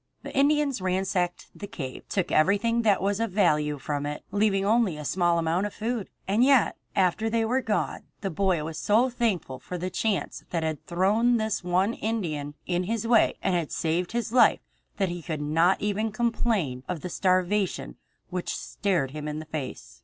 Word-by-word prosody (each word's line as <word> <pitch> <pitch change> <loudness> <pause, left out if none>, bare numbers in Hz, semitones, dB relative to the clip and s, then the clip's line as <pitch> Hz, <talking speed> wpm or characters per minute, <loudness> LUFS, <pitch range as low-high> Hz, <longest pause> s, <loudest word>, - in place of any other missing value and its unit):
The - - -7
Indians 285 -3 +2
ransacked 185 -1 -1
the 205 - -8
cave, 135 -9 -7
took 190 -3 -1
everything 205 +8 +3
that 210 -5 +2
was 200 +1 +1
of 230 0 0
value 150 -7 +2
from 145 +1 -3
it, 150 0 -5
leaving 200 -1 +2
only 215 -6 +2
a 150 - -7
small 175 +4 +2
amount 170 +4 +1
of 205 - -11
food. 225 -1 -3 0.2
And 210 +5 +3
yet 270 -2 +4 0.2
after 195 +3 +2
they 225 0 +1
were 255 +4 +1
gone 215 -4 -2 0.2
the 195 - -2
boy 180 -2 +1
was 155 0 -5
so 230 +5 +3
thankful 200 - -1
for 180 - -6
the 180 +2 -4
chance 210 -1 -1
that 165 -2 -1
had 155 -2 -3
thrown 210 +7 +3
this 220 -3 -1
one 185 +5 +1
Indian 160 -12 -3
in 180 0 0
his 230 +3 -2
way 230 -1 +4
and - - +1
had 170 -4 -1
saved 170 +3 -1
his 235 -1 -2
life 240 -3 +5 0.4
that 195 -2 +1
he 175 0 -5
could 160 -2 -4
not 165 +5 +2
even 210 +2 0
complain 215 - 0
of 175 -4 -3
the - - -4
starvation 185 - 0 0.4
which 180 -1 -3
stared 180 -10 -1
him 150 +1 -6
in 150 0 -3
the 155 - -6
face. 130 - -6
190 Hz, 190 wpm, -27 LUFS, 165-220 Hz, 0.4 s, life